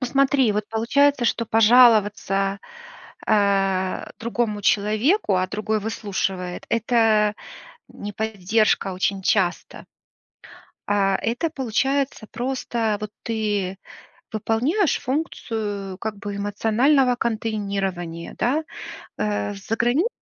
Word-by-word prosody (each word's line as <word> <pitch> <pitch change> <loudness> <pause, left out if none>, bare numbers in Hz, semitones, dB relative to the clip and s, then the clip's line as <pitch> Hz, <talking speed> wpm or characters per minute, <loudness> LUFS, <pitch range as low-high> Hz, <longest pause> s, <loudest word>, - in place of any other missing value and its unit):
Посмотри: 265 -2 +2
вот 210 0 -1
получается, 245 +4 +2
что 230 +1 +1
пожаловаться, 210 -4 +4 0.7
э, 195 -3 +1
другому 230 -3 -2
человеку, 215 - +2
а 185 0 +1
другой 215 +1 -2
выслушивает- 195 -4 -3
это 225 -2 +2 0.6
не 205 0 -7
поддержка 215 -1 0
очень 190 +1 -1
часто. 185 -2 0 1.0
А, 195 -1 +2
это 240 +9 -2
получается, 270 -2 -1
просто 240 -4 -2
вот 210 -1 -5
ты 205 -4 -1 0.6
выполняешь 255 - +1
функцию 215 - -3
как 215 -2 -4
бы 205 0 -6
эмоционального 235 +6 +2
контейнирования, 200 -7 -3
да. 285 +6 +1 0.5
Э, 205 -1 -1
в - - -9
за 205 +3 -3
границей 255 - +2
215 Hz, 100 wpm, -23 LUFS, 200-240 Hz, 1.0 s, пожаловаться